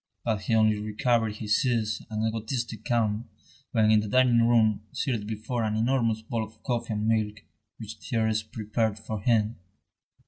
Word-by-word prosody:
But 110 -3 0
he 110 +4 0
only 110 -1 +3
recovered 110 +1 0
his 110 -1 +1
ease 115 -4 0
and 110 0 -1
egotistic 115 0 -3
calm 115 -2 0 0.4
when 110 -2 +3
in 110 - +6
the 105 - -2
dining 125 +1 +4
room, 110 -3 +3
seated 115 -6 -2
before 110 +3 -3
an 110 -1 0
enormous 115 -1 +1
bowl 115 0 -2
of 110 0 -12
coffee 120 -2 -2
and 105 +1 -1
milk, 110 -1 0 0.4
which 110 -1 -8
Thérèse 110 -3 -1
prepared 110 0 -1
for 110 -1 -5
him. 110 0 +2
110 Hz, 165 wpm, -27 LUFS, 110-115 Hz, 0.4 s, in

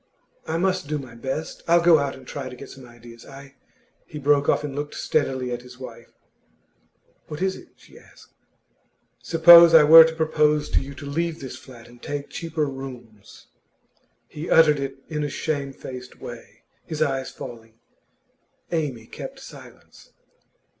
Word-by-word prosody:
'I 160 +1 -1
must 185 -2 -1
do 150 0 -2
my 130 -4 -10
best. 135 +6 -5
I'll 170 +1 +5
go 170 -2 +6
out 140 -1 -2
and 130 -1 -15
try 135 0 -6
to 125 - -10
get 140 - -11
some 130 -2 -13
ideas. 120 0 -15
I 135 0 -13 0.3
' 255 0 -40
He 155 - -9
broke 145 0 +2
off - - +2
and 145 -2 -5
looked 145 +1 -5
steadily 130 -4 -1
at 120 0 -4
his 125 0 -14
wife. 120 -3 -11 1.2
'What 150 - -7
is 190 0 -1
it?' - - -15
she - - -18
asked. - - -20 0.9
'Suppose 170 0 +8
I 160 - +9
were 160 +2 +10
to 160 0 -2
propose 150 -2 +1
to - - +2
you 140 +1 -9
to 145 - -10
leave 165 +3 -3
this 130 - -8
flat 120 -3 -14
and 120 0 -18
take 145 -1 -6
cheaper 160 -2 -3
rooms?' 125 -6 -10 0.8
He 155 +3 -8
uttered 150 -3 +5
it 135 0 -5
in 150 -2 -3
a 145 - -2
shamefaced 135 -4 -6
way, - - -11 0.2
his 155 -1 -2
eyes 135 -3 -2
falling. 115 -2 -11 1.0
Amy 145 -9 -3
kept - - -9
silence. - - -15
140 Hz, 165 wpm, -23 LUFS, 130-160 Hz, 1.2 s, were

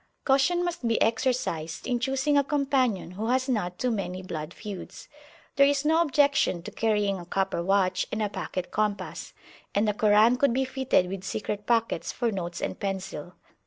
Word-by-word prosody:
Caution 345 +7 +3
must 345 -8 -3
be 230 - +2
exercised 225 - 0
in 245 -2 0
choosing 270 +3 +1
a 285 - +5
companion 265 - 0
who 210 +5 -4
has 255 +2 +1
not 180 -8 -1
too 250 - 0
many 185 -4 -3
blood 155 -3 -5
feuds. 200 -1 -8 0.5
There 275 0 +7
is 285 0 +1
no 320 +2 +4
objection 285 - +2
to - - -7
carrying 210 -3 0
a 175 - -9
copper 190 -2 -1
watch 185 0 +1
and 220 - -2
a - - +1
pocket 185 -2 -5
compass, 205 -3 -2 0.4
and 205 +2 +2
a 210 - +2
Koran 215 +3 +4
could 275 -2 +3
be 265 0 +1
fitted 260 -8 +1
with 190 0 -5
secret 210 +1 -4
pockets 230 -1 +1
for 240 -2 -1
notes 175 -3 -4
and - - -3
pencil. 190 -4 -4
215 Hz, 180 wpm, -27 LUFS, 190-265 Hz, 0.5 s, There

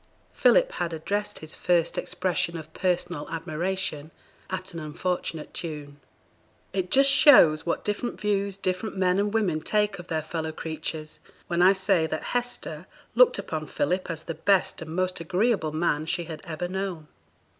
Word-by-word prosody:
Philip - - +4
had 170 - -3
addressed 205 +6 -2
his 155 0 -6
first 170 -2 +1
expression 180 -2 -1
of 160 0 -10
personal 175 -4 -1
admiration 165 -1 -3 0.4
at 185 0 -4
an 170 - -5
unfortunate 160 0 -3
tune. 150 -3 -6 0.7
It 185 -2 -1
just 275 +1 +5
shows 170 - +7
what 170 - -1
different 210 +4 -2
views 200 -2 0
different 190 +2 -2
men 185 0 +2
and 205 0 +1
women 195 -8 +1
take 210 0 0
of 175 - -9
their 160 -1 -1
fellow 160 0 -4
creatures, 155 -1 -5 0.3
when 170 0 0
I 185 +2 +7
say 190 -4 +2
that 155 0 -3
Hester 245 0 -3 0.3
looked - - +6
upon - - -4
Philip 190 -12 -1
as 165 -2 -4
the 165 - -4
best 190 +3 +1
and 160 0 -6
most 185 0 0
agreeable 180 0 +1
man 155 -1 0
she 175 +1 0
had 160 -2 -8
ever 170 +1 -3
known. 185 -4 -4
180 Hz, 160 wpm, -26 LUFS, 160-195 Hz, 0.7 s, shows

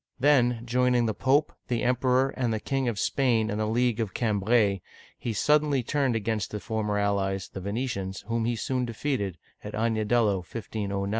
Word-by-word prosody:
Then, 125 -4 +3
joining 125 0 +2
the 110 - 0
Pope, 140 +7 +2
the 120 -2 -1
Emperor, 125 +1 +2
and 125 -3 -1
the 110 - -1
King 135 +3 -1
of 115 -4 -1
Spain 115 -3 +1
in 105 - -2
the 110 - 0
League 120 +1 +1
of 105 -5 -2
Cambrai 105 -4 -1
(caN 105 -5 +3
bre'), - - -32 0.4
he 120 - -3
suddenly 145 +3 +2
turned 135 -2 0
against 110 -1 -1
the 105 - -4
former 105 -2 -2
allies, 100 -2 0
the 95 - -5
Venetians, 100 -2 -3
whom 115 +1 -2
he 120 0 0
soon 125 +2 -1
defeated 115 - -2 0.3
(at - - -7
Agnadello, 110 -1 +2
1 - - -5
509). 100 0 -4
115 Hz, 190 wpm, -27 LUFS, 105-125 Hz, 0.4 s, Then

